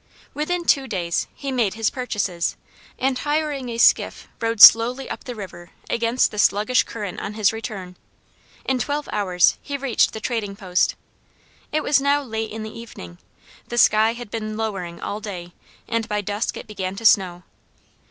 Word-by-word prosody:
Within 340 +4 -2
two 275 -4 +3
days 175 -6 -2
he 275 -1 -6
made 230 -6 0
his 225 -1 0
purchases, 205 -9 -2 0.4
and 260 -1 0
hiring 295 -3 -1
a 230 - -4
skiff - - +3
rowed 230 -1 -1
slowly 245 +5 +8
up - - -7
the 245 - -6
river 175 -4 -9 0.2
against 235 +2 +1
the 210 - -6
sluggish 210 +5 +3
current 205 -5 -6
on 210 - -5
his 215 -1 +2
return. 200 -5 -6 0.7
In 265 -1 0
twelve 290 +3 -2
hours 185 -4 +2
he 285 -1 -4
reached 270 -4 +1
the 220 - -5
trading 215 -4 -3
post. 185 -2 0 0.8
It 310 0 0
was 280 -2 +3
now 285 +1 +2
late 220 -3 -4
in 220 0 -6
the 220 - -8
evening. 90 - -10 0.5
The 240 - -5
sky 220 0 +5
had 240 -3 -9
been 215 -1 -4
lowering 195 -6 -4
all 205 - -4
day, 180 -5 -7 0.3
and 230 -1 -2
by 210 0 0
dusk 205 +2 -3
it - - -8
began 190 -2 -5
to 225 - -8
snow. 180 -4 +4
220 Hz, 170 wpm, -22 LUFS, 200-250 Hz, 0.8 s, slowly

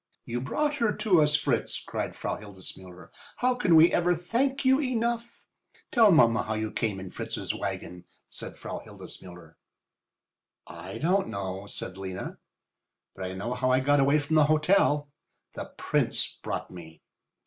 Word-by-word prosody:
"You 120 +1 -3
brought 295 - 0
her 230 -5 +2
to 185 -7 +4
us, 150 0 +4
Fritz," 140 -5 0
cried - - -4
Frau - - -3
Hildesmuller. 95 -3 -11 0.3
"How 250 +1 +2
can 225 -9 +3
we 160 +2 +7
ever 175 +1 +3
thank 260 - -1
you 265 +2 +5
enough?" 235 -2 -2 0.5
"Tell 225 -5 +6
mamma 115 -8 +5
how 110 - -3
you 110 0 -2
came 105 -4 -2
in 95 -1 -8
Fritz's - - -4
wagon," 90 0 -5 0.2
said - - -9
Frau - - -6
Hildesmuller. 90 -3 -11 1.1
"I - - -8
don't 190 +4 +2
know," 95 0 -5
said 95 -1 -6
Lena. 95 -1 -6 0.8
"But 95 - -5
I 95 - -4
know 110 +6 -3
how 130 +1 0
I 130 0 +4
got 145 +2 +3
away 140 +2 +4
from 150 +1 +1
the 155 - +6
hotel. 150 -2 +3 0.4
The - - -7
Prince - - 0
brought - - -4
me." 80 -3 -12
145 Hz, 160 wpm, -28 LUFS, -, 1.1 s, we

